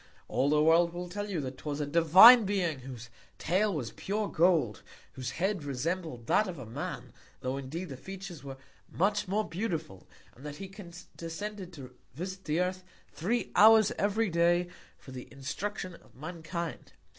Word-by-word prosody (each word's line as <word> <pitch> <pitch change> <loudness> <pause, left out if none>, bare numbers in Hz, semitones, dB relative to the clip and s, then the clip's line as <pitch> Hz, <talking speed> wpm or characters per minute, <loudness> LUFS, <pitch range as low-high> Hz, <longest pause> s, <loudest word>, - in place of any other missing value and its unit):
All 140 - +1
the 150 0 +3
World 165 +2 +4
will 180 0 -4
tell 205 +3 -4
you, 185 -5 -2
that 130 -1 -6
'twas 150 -1 -4
a 150 - -1
divine 170 - +8
Being 185 -7 -1
whose 125 -2 -9 0.3
Tail 195 +5 +1
was 140 -10 -3
pure 210 +2 -2
Gold, 160 - +2 0.3
whose 130 -1 -5
Head 190 -2 0
resembled 145 -1 -3
that 210 - +3
of 180 -3 -6
a 130 - -8
Man, 110 - -6 0.3
tho' 130 +1 -2
indeed 155 +7 -5
the 135 - -7
Features 190 0 -9
were 135 -1 -8 0.3
much 205 +3 0
more 210 +3 0
beautiful; 165 - -4 0.3
and 130 - -17
that 150 -1 -6
he 195 +3 -8
condescended 185 +1 -8
to 130 -5 -10 0.2
visit 190 +4 -6
the 155 +3 +1
Earth 185 0 -2 0.3
three 225 +9 -2
Hours 220 0 +7
every 205 0 +1
Day, 175 +1 +2 0.3
for 130 - -13
the 130 -1 -8
Instruction 180 +7 -5
of - - -18
Mankind. 165 +3 -6
170 Hz, 170 wpm, -30 LUFS, 145-195 Hz, 0.3 s, divine